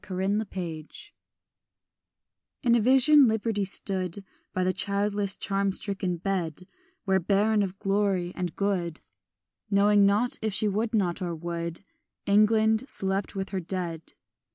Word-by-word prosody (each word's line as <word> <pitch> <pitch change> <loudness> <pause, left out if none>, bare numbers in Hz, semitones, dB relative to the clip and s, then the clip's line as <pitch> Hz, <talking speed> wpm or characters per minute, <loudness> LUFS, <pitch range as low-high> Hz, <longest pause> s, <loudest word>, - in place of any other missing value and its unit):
PERINDE 190 +3 -1
AC 200 -3 -9 0.3
CADAVER 415 - -11 1.5
IN 240 -2 +3
a 235 - +4
vision 265 +4 +6
Liberty 220 -1 0
stood 190 -1 -1 0.3
By 185 -2 -1
the 185 0 +1
childless 200 +1 0
charm 195 0 0
stricken 190 -2 -2
bed 180 -2 -3 0.4
Where, 190 -1 +2
barren 205 +4 +2
of 195 -1 -3
glory 195 -3 0
and 180 -3 -4
good, 180 -5 -1 0.7
Knowing 205 0 +4
nought 215 +5 +1
if 220 -2 -1
she 215 - +3
would 215 +3 -1
not 185 -3 0
or 175 -2 -3
would, 170 +1 -4 0.4
England 220 +4 +3
slept 195 +1 -2
with 195 0 -3
her 190 - -2
dead. 170 -2 -4
200 Hz, 135 wpm, -27 LUFS, 185-210 Hz, 1.5 s, vision